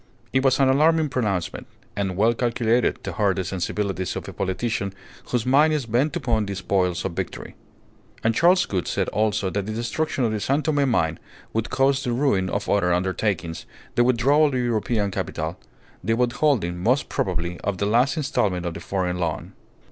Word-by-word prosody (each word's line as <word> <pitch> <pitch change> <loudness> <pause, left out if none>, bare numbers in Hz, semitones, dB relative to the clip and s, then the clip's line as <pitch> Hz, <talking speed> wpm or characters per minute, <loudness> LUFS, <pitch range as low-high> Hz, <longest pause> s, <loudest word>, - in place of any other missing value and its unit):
It 130 0 +2
was 135 0 +3
an 135 - +5
alarming 155 +3 +3
pronouncement, 100 -9 -2 0.3
and 95 -3 -2
well 110 +4 +4
calculated 120 0 +1
to - - -4
hurt 100 -4 +1
the 95 - -1
sensibilities 95 0 -2
of - - -5
a - - -7
politician 100 +1 -2 0.3
whose 125 -2 -1
mind 145 +5 +4
is 150 -5 -1
bent 125 +9 +1
upon 115 -10 0
the 100 - -3
spoils 90 -3 0
of 95 - -1
victory. 85 - -5 0.7
And 110 - +3
Charles 175 +9 +4
Gould 95 -4 -2
said - - -1
also 105 -2 0
that 100 -1 -2
the - - -3
destruction 125 +5 -1
of 115 - +1
the 110 - -1
San 140 +8 0
Tome 145 -3 +1
mine 80 -9 +1 0.3
would 115 0 -1
cause 135 +1 +2
the 120 - -1
ruin 120 -8 +1
of - - -2
other 95 -3 +2
undertakings, 90 -1 -1 0.3
the 120 - +3
withdrawal 130 +5 +4
of 140 - -2
European 115 -4 0
capital, 80 0 -4 0.4
the 115 +4 +1
withholding, 120 - +1
most 125 +9 +1
probably, 85 -1 -2
of 100 -2 -2
the 100 - -1
last 120 +9 +2
instalment 100 - 0
of 85 - -2
the 85 - -7
foreign 90 -1 -2
loan. 85 -3 -3
110 Hz, 185 wpm, -24 LUFS, 95-130 Hz, 0.7 s, an